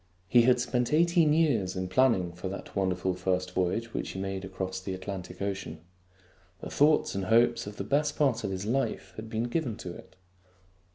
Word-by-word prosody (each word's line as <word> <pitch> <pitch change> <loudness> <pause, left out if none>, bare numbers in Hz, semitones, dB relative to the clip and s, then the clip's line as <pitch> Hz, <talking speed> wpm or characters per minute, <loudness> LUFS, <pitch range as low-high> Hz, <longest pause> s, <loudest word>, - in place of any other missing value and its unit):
He 120 +6 +6
had 125 -1 +4
spent 125 +2 0
eighteen 170 -1 +4
years 135 - +2
in 95 0 -2
planning 95 -4 +2
for 90 +2 -6
that 100 - -8
wonderful 95 -1 0
first 90 0 -1
voyage 105 +6 -1
which - - -3
he 95 - -5
made 95 0 -3
across 95 0 -4
the 95 0 -4
Atlantic 95 -1 -6
Ocean. 95 -5 -4 0.8
The - - -7
thoughts 150 +1 +3
and 100 -1 -2
hopes 115 +2 +3
of 105 - -8
the - - -3
best 145 +1 +1
part 135 -7 +1
of 100 - -1
his 95 +1 -4
life 130 +5 -1
had 110 0 -8
been 110 0 -1
given 120 -2 -2
to 90 - -7
it. - - -14
100 Hz, 190 wpm, -29 LUFS, 95-125 Hz, 0.8 s, He